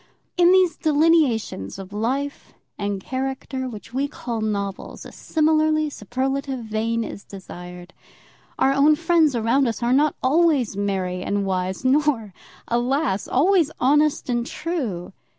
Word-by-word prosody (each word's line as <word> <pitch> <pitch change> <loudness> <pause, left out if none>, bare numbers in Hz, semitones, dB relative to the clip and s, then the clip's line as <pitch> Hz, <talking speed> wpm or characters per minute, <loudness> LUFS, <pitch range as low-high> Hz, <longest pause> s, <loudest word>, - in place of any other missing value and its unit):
In 355 -1 +5
those 370 -4 +4
delineations 295 - +1
of 195 0 -9
life 265 +7 -3 0.2
and 200 -1 -3
character 260 +2 -4
which 230 0 -10
we 275 +2 0
call 235 -5 -5
novels 200 -2 -4
a - - -10
similarly 310 -1 +1
superlative 265 +3 -3
vein 225 +1 -1
is 200 - -8
desired. 180 -2 -10 0.6
Our 270 - +3
own 290 +2 +5
friends 325 -3 +2
around 240 +4 +2
us 230 +1 -3
are 240 +1 +2
not 295 +2 +3
always 285 - +2
merry 190 -3 -2
and 200 +1 -1
wise, 185 +4 -2
nor, 260 -7 +1 0.3
alas! 240 -2 0
always 335 +3 +3
honest 295 +3 +2
and 240 -2 0
true. 240 - -4
255 Hz, 135 wpm, -22 LUFS, 205-300 Hz, 0.6 s, In